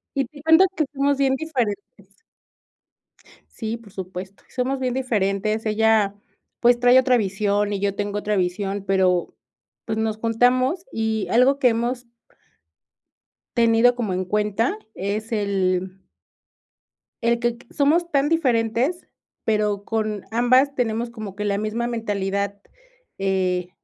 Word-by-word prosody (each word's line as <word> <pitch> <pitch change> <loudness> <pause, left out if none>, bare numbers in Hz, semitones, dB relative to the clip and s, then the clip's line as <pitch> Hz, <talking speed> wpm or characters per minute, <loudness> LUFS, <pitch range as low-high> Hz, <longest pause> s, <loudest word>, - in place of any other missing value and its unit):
Y 275 -1 +1
te 290 +3 -14
cuento 320 +4 +6
que 310 - +1
somos 280 0 +1
bien 270 -1 +2
diferentes. 210 - -4 1.3
Sí, 225 0 -4
por 225 -3 -17
supuesto, 190 +1 -8
somos 260 +1 -2
bien 255 -2 -1
diferentes. 215 -3 -1
Ella, 215 -2 +2 0.4
pues, 240 0 +4
trae 245 +1 +6
otra 255 -1 +3
visión 205 0 0
y 200 - -2
yo 200 0 -1
tengo 205 0 -2
otra 210 0 -1
visión, 195 +2 -1
pero, 185 -2 +1 0.5
pues, 220 -1 -3
nos 220 -1 -1
juntamos 250 - +1
y 220 -2 -1
algo 255 +4 +4
que 255 - +5
hemos 240 +2 -2 1.5
tenido 230 +1 +4
como 225 -6 -2
en 185 +1 -1
cuenta 210 - 0 0.2
es 210 +4 -4
el 190 -3 -1 1.2
el 235 0 +2
quec 240 0 -2
somos 325 +5 +2
tan 280 0 +2
diferentes 255 0 +1 0.4
pero, 210 -2 0
con 215 -3 -2
ambas 255 +4 +3
tenemos 235 -1 -1
como 215 -4 -8
que 210 +1 -4
la 200 -1 0
misma 215 +3 -2
mentalidad, 200 -3 -2 0.6
eh, 185 -2 0
220 Hz, 130 wpm, -23 LUFS, 200-245 Hz, 1.5 s, cuento